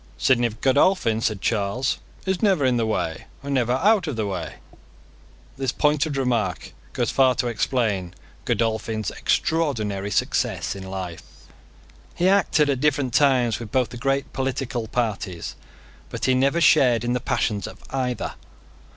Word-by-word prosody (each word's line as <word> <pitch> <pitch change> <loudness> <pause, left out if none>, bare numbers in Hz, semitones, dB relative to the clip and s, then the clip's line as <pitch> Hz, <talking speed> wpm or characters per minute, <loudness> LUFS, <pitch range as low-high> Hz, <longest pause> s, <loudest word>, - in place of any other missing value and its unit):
"Sidney 120 -2 +3
Godolphin," 130 - +2
said 110 -3 -1
Charles, 110 +4 0 0.3
"is 190 -2 -1
never 190 -10 +3
in 125 -1 +2
the 115 -1 0
way, 80 -7 -2 0.2
and 140 0 -3
never 125 -2 +2
out 190 +6 +3
of 150 - -2
the 110 -1 -1
way." 90 -5 -4 1.0
This 135 -2 -1
pointed 150 -1 +1
remark 120 -9 -1 0.2
goes - - 0
far 130 -2 +4
to - - -1
explain 110 -6 -1 0.3
Godolphin's 110 -1 -1
extraordinary 110 -12 0
success 100 - 0
in 95 -1 -8
life. 90 -3 -5 0.9
He 175 - +2
acted 190 -6 +3
at 140 -3 0
different 140 -4 +1
times 130 -5 +3
with 115 -3 -8
both 130 -2 +1
the 120 - -8
great 135 +2 -1
political 130 -3 -2
parties: 105 -7 -3 0.6
but - - -4
he 130 - +3
never 135 +6 +2
shared 125 -8 +5
in 120 0 0
the 125 - 0
passions 105 -3 -1
of - - -10
either. 125 -3 -2
125 Hz, 150 wpm, -23 LUFS, 110-140 Hz, 1.0 s, shared